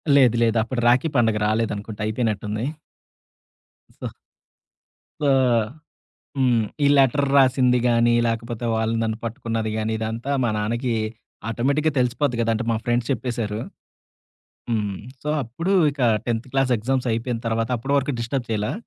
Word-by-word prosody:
లేదు, 125 Hz, -4 st, +5 dB
లేదు. 115 Hz, 0 st, +2 dB
అప్పుడు 120 Hz, +1 st, -3 dB
రాఖీ 125 Hz, +6 st, +4 dB
పండుగ 115 Hz, -3 st, +3 dB
రాలేదనుకుంట 110 Hz, -1 st, -2 dB
అయిపోయినట్టుంది. 110 Hz, -1 st, -2 dB, 1.3 s
సో -, -, -6 dB, 1.1 s
సో 145 Hz, -, +2 dB, 1.1 s
హ్మ్. 125 Hz, -4 st, +3 dB, 0.2 s
ఈ -, -, +4 dB
లెటర్ 140 Hz, +1 st, +3 dB
రాసింది 130 Hz, -2 st, +4 dB
గానీ 120 Hz, 0 st, +3 dB
లేకపోతే 115 Hz, +1 st, -3 dB
వాళ్ళు 110 Hz, +1 st, 0 dB
నన్ను 110 Hz, -1 st, -1 dB
పట్టుకున్నది 115 Hz, -2 st, -3 dB
గాని 110 Hz, 0 st, -1 dB
ఇదంతా 115 Hz, +4 st, -3 dB
మా 120 Hz, -, +2 dB
నాన్నకి 115 Hz, +4 st, -1 dB, 0.6 s
ఆటోమేటిక్‌గా 140 Hz, +7 st, +1 dB
తెలిసిపోద్ది 125 Hz, 0 st, 0 dB
గదా! 115 Hz, 0 st, +1 dB
అంటే 115 Hz, +2 st, -3 dB
మా 115 Hz, -, +1 dB
ఫ్రెండ్స్ 120 Hz, 0 st, 0 dB
చెప్పేసారు. 115 Hz, -3 st, -2 dB, 1.1 s
హ్మ్. 105 Hz, -4 st, -1 dB, 0.3 s
సో 150 Hz, -, -4 dB
అప్పుడు 150 Hz, -, -3 dB, 0.2 s
ఇక 140 Hz, 0 st, -9 dB, 0.3 s
10త్ 115 Hz, 0 st, -1 dB
క్లాస్ 135 Hz, -1 st, +2 dB
ఎగ్జామ్స్ 125 Hz, +3 st, -1 dB
అయిపోయిన 115 Hz, +1 st, -2 dB
తరువాత 115 Hz, 0 st, 0 dB
అప్పడు 135 Hz, +5 st, -1 dB
వరకు 140 Hz, 0 st, -1 dB
డిస్టర్బ్ 120 Hz, +1 st, -3 dB
చేయలా 105 Hz, -1 st, -1 dB
115 Hz, 135 wpm, -23 LUFS, 110-130 Hz, 1.3 s, లేదు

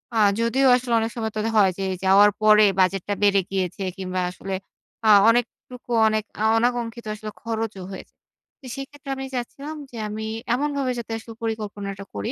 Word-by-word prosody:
আ -, -, +3 dB, 0.2 s
যদিও 260 Hz, +4 st, +3 dB
আসলে 245 Hz, -1 st, -2 dB
অনেক 225 Hz, 0 st, -2 dB
সময় 220 Hz, -2 st, -3 dB
তো -, -, -1 dB
এদা 225 Hz, -, -1 dB
হয় 195 Hz, -3 st, +5 dB
যে, 195 Hz, -, -1 dB, 0.2 s
যাওয়ার 200 Hz, +2 st, +6 dB
পরে 215 Hz, 0 st, +7 dB
বাজেটটা 190 Hz, +2 st, +1 dB
বেড়ে 200 Hz, -1 st, +5 dB
গিয়েছে, 190 Hz, 0 st, -2 dB
কিংবা 185 Hz, -1 st, -3 dB
আসলে 190 Hz, +1 st, -5 dB, 0.5 s
আ -, -, +6 dB, 0.2 s
অনেকটুকু 245 Hz, +1 st, -2 dB, 0.2 s
অনেক 215 Hz, -1 st, +1 dB, 0.2 s
আ -, -, +3 dB
অনাকঙ্ক্ষিত 235 Hz, -1 st, -1 dB
আসলে 215 Hz, 0 st, -7 dB
খরচও 225 Hz, -4 st, -4 dB
হয়েছে। 190 Hz, -, -10 dB, 0.5 s
তো 265 Hz, -, -16 dB
সেক্ষেত্রে 275 Hz, +1 st, -9 dB
আমি 270 Hz, -, -5 dB
চাচ্ছিলাম 275 Hz, +5 st, -5 dB, 0.2 s
যে, 240 Hz, -, -9 dB
আমি 220 Hz, +1 st, -5 dB, 0.3 s
এমনভাবে 280 Hz, -1 st, -1 dB
যাতে 230 Hz, -1 st, -7 dB
আসলে 225 Hz, 0 st, -10 dB
পরিকল্পনাটা 205 Hz, -3 st, -4 dB
করি, 100 Hz, -, -3 dB
220 Hz, 170 wpm, -23 LUFS, 200-245 Hz, 0.5 s, পরে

